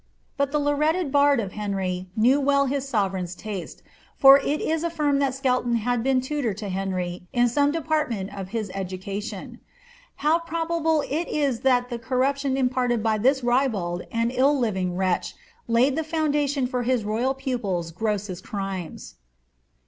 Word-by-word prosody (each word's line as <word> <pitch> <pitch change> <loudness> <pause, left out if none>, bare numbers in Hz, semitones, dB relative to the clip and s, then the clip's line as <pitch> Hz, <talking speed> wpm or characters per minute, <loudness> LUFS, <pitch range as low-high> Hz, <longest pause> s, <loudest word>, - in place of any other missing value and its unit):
But 280 -1 0
the 300 - +1
laureated 300 +2 +1
bard 285 -1 +4
of 200 -4 -3
Henry 190 -3 -3
knew 250 +6 +4
well 280 0 +3
his 275 0 -2
sovereign's 190 -6 -1
taste, 200 -2 -7 0.3
for 275 0 +9
it 290 +2 -1
is 320 0 -1
affirmed 300 -4 +1
that 270 -2 0
Skelton 250 -3 +1
had 235 +1 0
been 260 +1 +2
tutor 260 -6 -2
to 210 -1 -6
Henry 185 -2 -3
in 245 0 +4
some 285 +4 +2
department 290 -11 -1
of 190 -2 -6
his 215 -3 -3
education. 195 +1 -5 0.7
How 320 +2 +4
jMrobable 330 -2 0
it 320 +5 -2
is 280 -6 0
that 250 -1 +2
the 240 - -3
corruption 265 +3 0
imparted 250 -3 +1
by 220 -1 +1
this 265 +4 +2
ribald 225 -9 0
and 230 +1 0
illrliving 235 -9 +1
wretch 185 -1 0 0.3
laid 250 +4 +3
the 320 - -1
foun 315 -1 -1
dation 285 -3 +1
for 250 0 -2
his 245 -1 +1
royal 235 +6 0
pupil's 205 -11 -2
grossest 200 -1 -3
crimes 190 - -6
250 Hz, 155 wpm, -24 LUFS, 200-280 Hz, 0.7 s, for